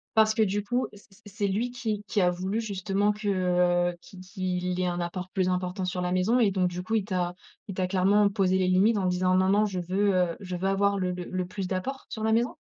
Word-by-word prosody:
Parce 220 0 +5
que 220 - +1
du 205 +1 0
coup, 245 +5 -1
c 205 - -15
c 195 +4 -22
c'est 205 0 -2
lui 225 +6 -1
qui 220 -4 -3
qui 205 +1 -1
a 180 -2 +4
voulu 190 +5 -2
justement 200 -1 0
que, 210 -1 -3
heu, 180 -2 +2
qu'il 190 - -14
qu'il 185 -1 -3
ait - - +1
un 175 0 -2
apport 180 +2 -4
plus 185 -2 0
important 180 0 -1
sur 180 0 -2
la 180 0 -1
maison? 185 +7 +2
Et 210 -4 +4
donc 185 -1 +1
du 180 +1 -5
coup, 220 +4 -1
il 205 -3 +1
t'a 180 -3 -1 0.4
il 195 - -5
t'a 185 -1 0
clairement 200 +2 +3
posé 190 -2 +1
les 185 -1 +1
limites 195 +5 +4
en 190 - 0
disant: 185 0 +2
«Non 185 0 +3
non, 210 +2 +4
je 190 -3 -3
veux, 190 +3 +1
heu, 180 -2 +1
je 180 -2 -5
veux 190 +2 -1
avoir 200 +1 +2
le 180 -1 0
le 180 0 -4
plus 190 0 -4
d'apport, 255 +9 -4
sur 220 - -5
la 220 - +2
maison»? 235 +2 +1
190 Hz, 255 wpm, -27 LUFS, 180-205 Hz, 0.4 s, Parce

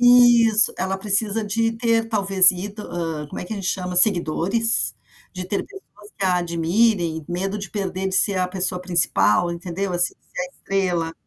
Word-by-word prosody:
Isso 240 -3 +5
ela 190 +1 -2
precisa 210 +2 0
de 225 +2 -1
ter 225 -1 -1
talvez 195 -3 +5
ido, 205 +4 -8
hã, 165 -5 -6
como - - -8
é - - -7
que 180 - -8
a - - -5
gente 195 -2 -6
chama, 180 -1 -3
seguidores, 195 +4 +3 0.4
de 185 -1 -7
ter 195 +2 -4
pessoas 215 - -16
que 200 - -4
a 185 -1 +1
admirem, 170 0 -1
medo 190 +4 -4
de 195 -2 -7
perder 190 -1 -4
de 190 - -4
ser 200 0 +3
a 185 - 0
pessoa 185 0 -2
principal, 175 -1 +1
entendeu, 180 +2 -5
assim, 175 0 +1 0.2
da 180 - -3
estrela. 180 -4 -3
190 Hz, 175 wpm, -21 LUFS, 180-215 Hz, 0.4 s, Isso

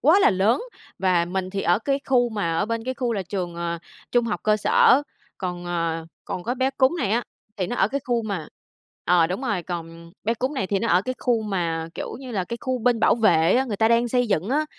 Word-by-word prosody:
quá 320 +8 +6
là - - +6
lớn, 205 - +2 0.4
và 180 -3 +2
mình 185 +1 -3
thì 195 0 -3
ở 175 +4 +3
cái 275 +4 -1
khu 245 -2 +3
mà 205 -7 -2
ở 205 - +1
bên 230 0 -3
cái 260 - -2
khu 245 -3 -1
là 200 - -1
trường, 175 -1 -4
ờ, 170 0 -3 0.3
trung 240 -1 +3
học 215 - -2
cơ 215 0 +3
sở, 260 +6 +5 0.4
còn, 180 -2 -4
ờ 165 -2 -2 0.2
còn 180 - -4
có 245 +5 -2
bé 260 +1 +1
cún 265 -1 +3
này 200 - 0
á, 235 +2 +2 0.3
thì 185 -3 -1
nó 245 - -3
ở 195 - +3
cái 280 +3 -2
khu 240 -2 0
mà 195 -8 -4 0.6
ờ, 170 -1 +4
đúng 185 +8 -3
rồi, 205 -8 -1
còn 170 -1 -7
bé 230 +2 +1
cún 260 +5 -2
này 195 -8 -1
thì 195 0 0
nó 230 - -1
ở 180 +2 +4
cái 255 - -3
khu 235 -3 +1
mà, 165 -5 -2
kiểu - - -5
như 260 - -8
là, 195 -6 -1
cái 235 +5 -5
khu 255 -1 -1
bên 240 -1 +2
bảo - - +5
vệ 175 -7 +4
á, 265 - +2
người 220 -6 -3
ta 220 +1 +3
đang 235 +1 +3
xây 245 0 +2
dựng 195 0 0
á. 300 +4 +1
210 Hz, 255 wpm, -24 LUFS, 175-245 Hz, 0.6 s, quá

